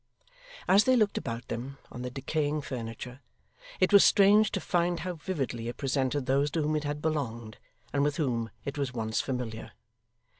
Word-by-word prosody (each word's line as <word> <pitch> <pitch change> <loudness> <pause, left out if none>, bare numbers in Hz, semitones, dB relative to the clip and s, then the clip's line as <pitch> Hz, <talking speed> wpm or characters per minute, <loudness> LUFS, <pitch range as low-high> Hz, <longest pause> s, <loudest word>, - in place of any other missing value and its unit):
As 200 +2 +6
they 260 - +5
looked 215 -4 +2
about 115 +1 -5
them 130 +4 -5
on 120 - -7
the 125 - -3
decaying 145 +3 -2
furniture, 125 0 -6 0.6
it - - +3
was 200 - +9
strange 205 +2 +5
to 195 - 0
find 175 -1 0
how 180 0 -3
vividly 140 -9 -3
it 120 - -5
presented 135 0 0
those 140 +2 +2
to 160 +1 -1
whom 155 +1 0
it 150 -1 -1
had 145 +1 -3
belonged, 120 -8 -3 0.3
and 140 - +2
with 145 0 0
whom 120 -7 -1 0.2
it 140 +1 -4
was 130 -3 -2
once 110 -1 -1
familiar. 125 -4 -5
140 Hz, 180 wpm, -29 LUFS, 125-160 Hz, 0.6 s, was